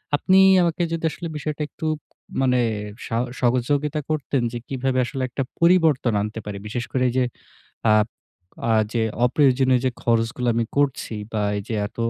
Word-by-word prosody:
আপনি 185 +6 +3 0.3
আমাকে 170 0 0
যদি 165 0 -2
আসলে 170 - -6
বিষয়টা 150 +1 -4
একটু, 160 - -8 0.6
মানে 125 -1 +3 0.5
সাও 115 0 0 0.2
সহযোগিতা 140 +5 +1
করতেন, 145 -3 0
যে 120 - -4
কিভাবে 130 -1 -1
আসলে 135 +1 -5
একটা 135 +2 -2 0.2
পরিবর্তন 165 -8 +4
আনতে 110 +2 -4
পারি? 105 -1 -5
বিশেষ 120 +3 -3
করে 130 -1 +1
এই - - -4
যে 130 - +4 0.7
আ - - +6 0.8
আ - - +4 0.2
যে 115 -2 +1 0.2
অপ্রয়োজনীয় 130 -2 +3
যে 130 - +3
খরচগুলো 115 +1 +1
আমি 115 0 +1
করছি 140 -5 0 0.2
বা 105 - 0 0.2
এইযে 110 +3 -5
এত 105 - -14
130 Hz, 160 wpm, -23 LUFS, 120-145 Hz, 0.8 s, আ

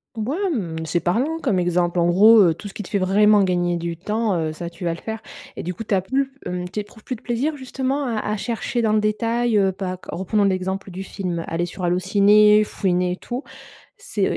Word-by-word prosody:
B 220 +1 -3
ouais 380 +7 -1
mmh, 165 - -3
c'est 170 +2 0
parlant 245 - 0
comme 230 -9 +1
exemple. 175 0 +1
En 170 - +3
gros, 210 +6 +7
heu, 170 -3 +4
tout 205 - -9
ce 195 - -10
qui 210 - -5
te - - -11
fait 205 - 0
vraiment 205 +2 +4
gagner 175 -2 +1
du 170 0 -4
temps, 210 +2 -1
heu, 155 -1 -2
ça, 170 +2 -6
tu 170 +1 -11
vas 170 - +1
le 165 - -8
faire 220 0 -5 0.3
et - - -6
du 180 - -3
coup, 205 - -7
tu 210 - 0
as 190 - +2
plus 265 +7 -1
mmh, 180 0 -3
tu 210 - -3
éprouves 210 +1 -15
plus 255 - -4
de 225 - -15
plaisir 265 +6 -1
justement 265 +1 -2
à 230 -4 -1
à 210 +1 -2
chercher 235 +2 -2
dans 215 -1 +2
le 215 - +4
détail, 230 +2 +1
heu? 195 -1 +3
Pas 185 -1 -4
q - - -17
reprenons 195 +3 0
l'exemple 190 0 -1
du 185 +2 -6
film, 180 -3 -4
aller 165 +1 -1
sur 180 +2 -8
Allo 175 0 +2
ciné, 210 +3 +5
fouiner 180 -3 0
et - - -4
tout. 245 +6 -5 0.5
C'est - - -1
200 Hz, 245 wpm, -22 LUFS, 180-225 Hz, 0.5 s, gros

